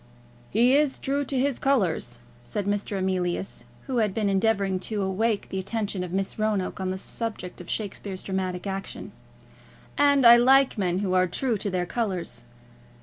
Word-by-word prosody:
"He 240 +5 +4
is 290 -2 +2
true 280 +1 -1
to 270 - -2
his 270 0 +1
colours," 185 - +1 0.3
said 185 +12 -4
Mr. 205 0 -1
Emilius, 185 -1 -2 0.2
who 260 -3 -3
had 210 -4 +1
been 210 -2 +1
endeavouring 195 -1 +1
to 210 -3 -1
awake 205 +3 0
the 190 - -3
attention 200 -1 -2
of 180 - -6
Miss 195 +3 -2
Roanoke 210 -4 -1
on 190 -1 -2
the 185 - -2
subject 190 -3 -5
of 175 - -11
Shakespeare's 200 -2 -4
dramatic 185 -1 -3
action, 195 0 -5 0.9
"and 285 -2 +5
I 235 0 +10
like 265 +2 +5
men 185 -4 0
who 185 - 0
are 185 0 +4
true 235 +7 -1
to 205 - -2
their 180 -2 -1
colours." 185 - -3
200 Hz, 170 wpm, -26 LUFS, 185-235 Hz, 0.9 s, I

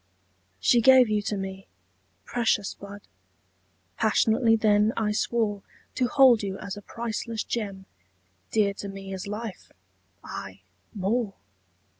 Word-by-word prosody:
She 235 - +4
gave 255 -1 +7
you 210 -1 +1
to 205 0 -3
me. 195 0 -6 0.6
Precious 225 -4 0
bud! 200 0 -11 1.0
Passionately 225 +1 +3
then 215 0 +3
I 215 -2 +1
swore 210 -1 0 0.3
To 255 - +1
hold 250 -3 +6
you 195 -1 -4
as 200 -1 -6
a 205 - -9
priceless 230 0 -4
gem, 200 -4 -4 0.6
Dear 205 -2 +2
to 200 - -7
me 195 0 -7
as 190 +1 -6
life 210 -1 -6 0.5
aye 95 0 -8 0.3
more! 205 +1 -1
210 Hz, 125 wpm, -26 LUFS, 195-230 Hz, 1.0 s, gave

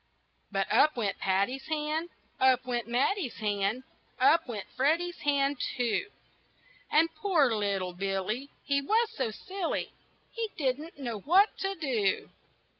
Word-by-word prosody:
But 195 -1 +1
up 305 -3 +5
went 210 -4 -1
Patty's 200 +9 0
hand, 310 +2 -1 0.3
Up 260 -1 +4
went 240 -2 -2
Matty's 260 - 0
hand, 205 +3 -1 0.4
Up 390 -7 +5
went 215 -5 -5
Freddy's 330 +7 +1
hand, 280 -1 +1 0.2
too, 245 - 0 0.8
And 325 +2 +3
poor 310 - +2
little 200 -4 -1
Billy 195 +8 -2
He 280 0 +1
was 440 +9 +2
so 260 -4 -1
silly, 370 - -4 0.4
He 455 -1 -3
didn't 295 +3 -2
know 240 -6 -4
what 370 - +4
to 390 0 -1
do. 240 - 0
270 Hz, 130 wpm, -29 LUFS, 220-325 Hz, 0.8 s, up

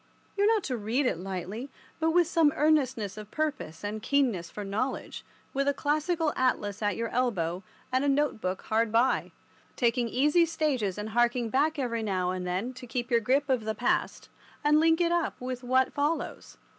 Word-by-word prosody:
You 405 0 +2
are - - +5
not 440 -3 +3
to 255 -3 -2
read 230 +6 0
it 210 - 0
lightly, 195 +7 -5 0.3
but 320 0 +2
with 350 +1 +4
some 325 -3 +3
earnestness 260 - +1
of 210 -1 -8
purpose 290 - -3
and 210 +1 -4
keenness 245 -12 +1
for 210 - -6
knowledge, 215 +7 -3 0.3
with 275 +1 0
a 285 - +2
classical 310 +2 0
atlas 210 -5 0
at 205 -2 +1
your 230 0 -2
elbow 185 -9 -1 0.3
and 260 +1 +2
a 285 - +2
note 280 -4 +1
book 185 +1 -3
hard 225 0 +1
by, 235 +3 +2 0.4
taking 240 -1 +1
easy 300 +8 +3
stages 280 - -1
and 210 +1 -4
harking 240 +1 +1
back 300 +6 +1
every 235 -4 -1
now 185 -4 0
and 185 -1 -4
then 190 +8 -2
to 250 0 -10
keep 240 +1 -3
your 235 - +5
grip 270 +5 +1
of 255 -5 +1
the 220 0 -2
past 245 - -1 0.4
and 295 +1 +5
to - - +5
link 325 +1 +4
it 340 -1 +2
up 345 -2 0
with 255 0 -5
what 260 +1 +2
follows. 295 +3 -2
250 Hz, 195 wpm, -28 LUFS, 215-295 Hz, 0.4 s, are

